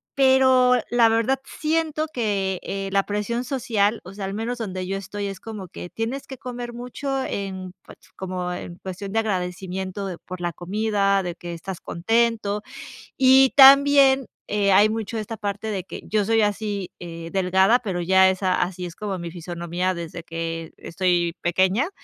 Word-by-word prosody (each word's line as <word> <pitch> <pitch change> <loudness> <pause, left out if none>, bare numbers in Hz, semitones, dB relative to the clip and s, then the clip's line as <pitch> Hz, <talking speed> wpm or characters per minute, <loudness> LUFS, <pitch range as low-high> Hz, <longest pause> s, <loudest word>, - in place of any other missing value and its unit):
pero 260 -2 +5 0.2
la 235 -1 +5
verdad 230 +4 +1
siento 315 0 -1
que, 200 -5 -1
eh, 195 0 -4
la 195 0 +3
presión 210 +4 -2
social, 230 -5 0
o 185 +2 -10
sea, 200 -1 -5
al 195 - -4
menos 235 +3 -3
donde 185 -4 -4
yo 195 +1 -3
estoy, 200 +1 -5
es 195 -1 -6
como 210 -5 -8
que 175 - -8
tienes 235 +5 -4
que 265 - -8
comer 245 -1 -6
mucho 265 +3 -3
en, 190 -2 -5
pues - - -14 0.2
como 180 -1 -4
en 175 -1 -7
cuestión 190 +1 -6
de 225 - +2
agradecimiento 190 -1 -3
de 180 -3 -5
por 185 -1 -9
la 175 0 -1
comida, 200 +1 0
de 175 -1 -4
que 175 -1 -7
estás 180 +2 -7
contento, 215 +2 0 0.6
y 265 0 +6
también, 275 -1 +7 0.2
eh, 205 -1 +1
hay 205 +3 +6
mucho 225 0 -3
de - - -1
esta 225 +2 -6
parte 205 +1 -4
de 190 -3 -3
que - - -8
yo 210 -1 +1
soy 225 0 +3
así, 205 -2 -1
eh, 165 -1 -7
delgada, 190 +5 +4
pero 190 -7 -3
ya 190 +2 +5
esa 185 0 +1
así 180 0 -2
es 175 - -8
como 200 -3 -4
mi 170 0 -5
fisionomía 175 +1 -3
desde 170 0 -7
que 165 -1 -5
estoy 175 -1 0
pequeña, 190 - +2
200 Hz, 175 wpm, -23 LUFS, 185-230 Hz, 0.6 s, también